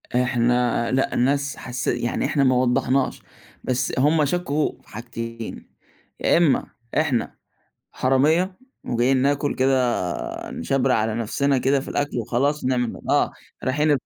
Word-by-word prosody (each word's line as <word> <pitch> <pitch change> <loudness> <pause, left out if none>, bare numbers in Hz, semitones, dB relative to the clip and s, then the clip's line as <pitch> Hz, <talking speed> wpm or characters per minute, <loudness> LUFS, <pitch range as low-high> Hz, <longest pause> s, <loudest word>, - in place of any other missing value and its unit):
إحنا 120 -1 +1
لأ، 135 +1 +1
الناس 140 +2 +1
حسّي 125 0 -2
يعني 120 - -1
إحنا 140 - +1
ما 130 -1 +4
وضّحناش، 125 +1 +1 0.4
بس 130 0 -1
هُم 150 +3 +3
شكّوا 155 -1 0
في - - -29
حاجتين، 115 0 -7 0.5
يا - - +3
إمّا 165 -5 +3 0.3
إحنا 145 -6 0 0.6
حرامية 155 +9 +2 0.3
وجايين 125 +3 +2
ناكل 140 +2 +1
كده 125 - 0
نِشبْرق 135 -1 +1
على 110 0 0
نَفْسنا 135 +5 0
كده 135 +2 +2
في 135 - -8
الأكل 145 -2 -2
وخلاص 130 +6 0
نعمل 125 -2 -1
آه، - - +3 0.3
رايحين 150 +4 +1
130 Hz, 130 wpm, -23 LUFS, 120-140 Hz, 0.6 s, ما